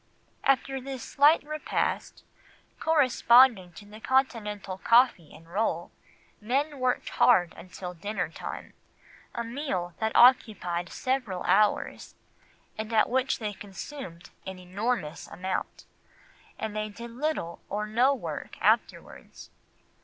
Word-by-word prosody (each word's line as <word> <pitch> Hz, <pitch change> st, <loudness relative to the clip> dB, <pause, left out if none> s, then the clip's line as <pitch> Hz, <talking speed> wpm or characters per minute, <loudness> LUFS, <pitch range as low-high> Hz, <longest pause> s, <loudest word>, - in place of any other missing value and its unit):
After 270 Hz, 0 st, +1 dB
this 265 Hz, -1 st, -6 dB
slight 295 Hz, +4 st, +4 dB
repast, 305 Hz, +1 st, -3 dB, 0.6 s
corresponding 250 Hz, -, +4 dB
to 205 Hz, -, -12 dB
the 210 Hz, +1 st, -12 dB
Continental 210 Hz, -7 st, -1 dB
coffee 230 Hz, -, +3 dB
and 165 Hz, +1 st, -15 dB
roll, 175 Hz, -2 st, -2 dB, 0.5 s
men 275 Hz, +6 st, -1 dB
worked 255 Hz, -1 st, 0 dB
hard 180 Hz, -9 st, +4 dB
until 180 Hz, 0 st, -8 dB
dinner 180 Hz, +1 st, -3 dB
time, 160 Hz, -, -8 dB, 0.6 s
a 235 Hz, -, -2 dB
meal 230 Hz, -, -3 dB
that 220 Hz, 0 st, -1 dB
occupied 195 Hz, -8 st, +4 dB
several 250 Hz, -8 st, -2 dB
hours, 205 Hz, +3 st, +1 dB, 0.6 s
and 220 Hz, +1 st, -4 dB
at 220 Hz, -1 st, +3 dB
which 260 Hz, +1 st, +1 dB
they 210 Hz, -2 st, -4 dB
consumed 195 Hz, -, -9 dB, 0.2 s
an 190 Hz, -1 st, -6 dB
enormous 185 Hz, -2 st, -3 dB
amount; 185 Hz, +2 st, -5 dB, 0.7 s
and 220 Hz, -1 st, -5 dB
they 215 Hz, 0 st, -2 dB
did 235 Hz, +3 st, -9 dB
little 245 Hz, -, -3 dB
or 210 Hz, +1 st, -2 dB
no 235 Hz, +6 st, +3 dB
work -, -, -7 dB
afterwards. -, -, -1 dB
220 Hz, 115 wpm, -28 LUFS, 185-260 Hz, 0.7 s, slight